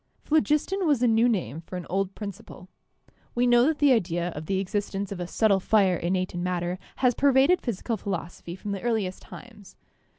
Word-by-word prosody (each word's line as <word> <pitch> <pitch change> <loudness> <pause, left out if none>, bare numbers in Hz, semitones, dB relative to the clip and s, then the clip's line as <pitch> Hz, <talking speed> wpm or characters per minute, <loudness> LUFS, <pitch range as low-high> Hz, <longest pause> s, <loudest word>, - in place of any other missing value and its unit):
Phlogiston 315 +5 +1
was 280 -5 +2
a - - +5
new 225 +2 +4
name 165 - -2
for 175 - -9
an 175 - -6
old 195 +1 -2
principle. 200 -3 -9 0.7
We 245 +1 +2
know 240 +1 +5
that 315 -1 +1
the 290 -2 +4
idea 175 -7 +1
of 155 -2 -8
the 195 - 0
existence 200 0 -3
of 195 - -5
a 175 - -4
subtle 200 0 +2
fire 195 -2 +3
innate 185 +2 -1
in 175 - -4
matter 180 0 -2 0.2
has 250 -1 +2
pervaded 275 +7 +4
physical 230 0 -3
philosophy 175 -3 -5
from 200 +2 -6
the 200 - -3
earli 225 -4 +1
est 185 - -9
times. 210 -6 -13
200 Hz, 195 wpm, -26 LUFS, 180-240 Hz, 0.7 s, a